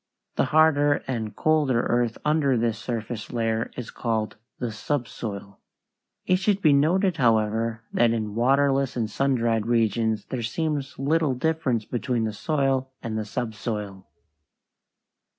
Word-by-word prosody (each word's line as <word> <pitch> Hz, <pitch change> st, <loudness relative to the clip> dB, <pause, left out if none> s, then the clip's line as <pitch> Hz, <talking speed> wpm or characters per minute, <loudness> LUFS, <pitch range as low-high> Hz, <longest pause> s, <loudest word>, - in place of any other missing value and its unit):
The -, -, +2 dB
harder 145 Hz, -2 st, +3 dB
and 115 Hz, -5 st, -3 dB
colder 150 Hz, -6 st, +2 dB
earth 120 Hz, -1 st, 0 dB
under 150 Hz, -4 st, +2 dB
this 115 Hz, -1 st, 0 dB
surface 115 Hz, -1 st, -5 dB
layer 115 Hz, -1 st, -1 dB
is 125 Hz, -, -6 dB
called 110 Hz, -2 st, -2 dB, 0.2 s
the 120 Hz, -3 st, -3 dB
subsoil. 110 Hz, -5 st, -4 dB, 0.7 s
It 185 Hz, -, +3 dB
should 195 Hz, +1 st, +1 dB
be 155 Hz, -7 st, +4 dB
noted, 175 Hz, +5 st, +3 dB
however, 115 Hz, -2 st, +1 dB
that 120 Hz, -, +4 dB
in 110 Hz, -2 st, -2 dB
waterless 135 Hz, +3 st, +2 dB
and 115 Hz, -2 st, 0 dB
sun 135 Hz, +5 st, +1 dB
dried 115 Hz, -2 st, 0 dB
regions 110 Hz, -1 st, +1 dB
there 130 Hz, -, -4 dB
seems 145 Hz, +3 st, -2 dB
little 145 Hz, 0 st, +1 dB
difference 130 Hz, -6 st, 0 dB
between 120 Hz, 0 st, -1 dB
the 110 Hz, -1 st, -2 dB
soil 135 Hz, 0 st, 0 dB
and 110 Hz, -1 st, -3 dB
the 110 Hz, -1 st, -2 dB
subsoil. 105 Hz, -3 st, -4 dB
120 Hz, 135 wpm, -25 LUFS, 110-140 Hz, 0.7 s, be